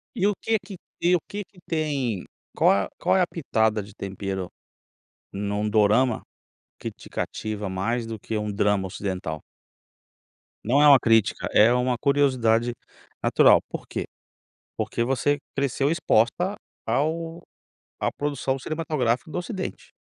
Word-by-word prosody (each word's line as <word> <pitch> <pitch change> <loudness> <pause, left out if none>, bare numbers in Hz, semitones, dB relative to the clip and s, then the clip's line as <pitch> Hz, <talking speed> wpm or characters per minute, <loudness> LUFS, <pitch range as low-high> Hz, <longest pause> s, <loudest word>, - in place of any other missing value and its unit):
E 195 - +1
o 210 - +2
quê 225 -1 +2
que 200 - -8 0.2
te 175 - +2
e 180 - +6
o - - +2
quê 205 0 -4
que 185 - -21
tem 140 - -1 0.3
qual - - +5
a - - -11
qual - - +2
é - - +4
a 175 - +2
"pitada 110 -9 0
de 100 0 -13
tempero", 95 -2 -4 0.8
num 105 +1 -2
dorama, 110 +3 +3 0.6
que - - -4
te - - -15
cativa 105 -2 -4
mais 115 +5 -1
do 110 -1 -5
que 110 - -4
um 105 0 -3
drama 100 -1 +1
ocidental? 90 -5 -4 1.2
Não 135 +6 +3
é 150 - +7
uma 140 -2 +9
crítica, 115 -3 +2
é 110 +3 +6
uma 125 0 +1
curiosidade 120 -4 +2 0.5
natural, - - +6
por - - -6
quê? - - -3 0.7
Porque 120 - -1
você 135 +3 +1 0.2
cresceu 140 +1 0
exposta 170 - +2 0.3
ao 165 +3 -1 0.6
à - - 0
produção 140 -2 -2
cinematográfica 150 -4 -1
do - - -3
ocidente. 185 +1 -5
125 Hz, 145 wpm, -25 LUFS, 105-150 Hz, 1.2 s, uma